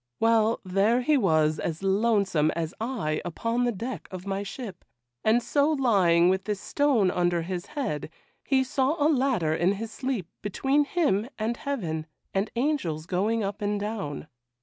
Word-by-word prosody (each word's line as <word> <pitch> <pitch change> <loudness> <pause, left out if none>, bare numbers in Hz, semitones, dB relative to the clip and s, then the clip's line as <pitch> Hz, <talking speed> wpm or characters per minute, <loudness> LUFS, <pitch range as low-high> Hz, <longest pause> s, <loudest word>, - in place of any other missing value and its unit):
Well, 225 0 +3
there 200 +6 +2
he 300 +4 +3
was, 155 - +2
as 165 +2 -3
lonesome 195 -6 +2
as 165 0 -2
I 215 -11 -1
upon 230 +8 -1
the 240 - +2
deck 235 +5 -5
of 185 0 -8
my 195 0 -2
ship; 200 -2 -7 0.4
and 230 +2 +3
so 285 +3 +2
lying 190 - +4
with 190 +1 +1
this 210 -2 -2
stone 255 -10 +2
under 175 -1 +1
his 180 +1 -4
head, 245 - -3 0.3
he 265 -2 +2
saw 265 +3 +1
a 290 - +1
ladder 255 - +2
in 175 +4 +2
his 220 +2 -5
sleep 250 -8 -3
between 270 +8 +1
him 260 - +1
and 225 +2 -1
heaven, 170 - -3 0.3
and 195 +3 0
angels 235 - -1
going 205 +5 0
up 200 +1 -4
and 205 0 0
down. 200 -10 -4
205 Hz, 165 wpm, -27 LUFS, 180-245 Hz, 0.4 s, lying